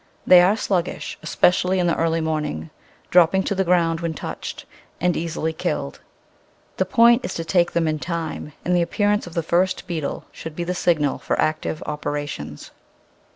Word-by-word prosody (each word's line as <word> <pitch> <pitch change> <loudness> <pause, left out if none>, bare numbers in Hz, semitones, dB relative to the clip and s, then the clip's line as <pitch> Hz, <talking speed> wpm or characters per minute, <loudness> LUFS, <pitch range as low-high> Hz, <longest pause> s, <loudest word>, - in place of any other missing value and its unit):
They 180 -1 +8
are 195 +5 +3
sluggish, 180 -5 -2
especially 180 +3 +2
in 180 - +1
the 170 - +2
early 165 0 +1
morning, 150 - -3 0.4
dropping 180 +2 +5
to - - -1
the 190 0 +1
ground 170 -2 +2
when 165 -1 -3
touched, - - -6 0.3
and 180 0 +1
easily 160 -1 -2
killed. 160 - -3 0.8
The - - +1
point 235 +1 +5
is 180 - -4
to 165 - -4
take 175 0 +2
them 170 -1 +1
in 155 -1 -1
time, 165 -3 -4
and 180 - +2
the 175 - +3
appearance 205 +3 0
of 170 - -10
the 170 - 0
first 185 +4 +1
beetle 165 -6 -4
should 160 -1 -8
be 175 - -3
the 180 +1 -2
signal 160 -5 +1
for - - -2
active 155 0 -1
operations. 145 - -5
170 Hz, 175 wpm, -22 LUFS, 160-180 Hz, 0.8 s, They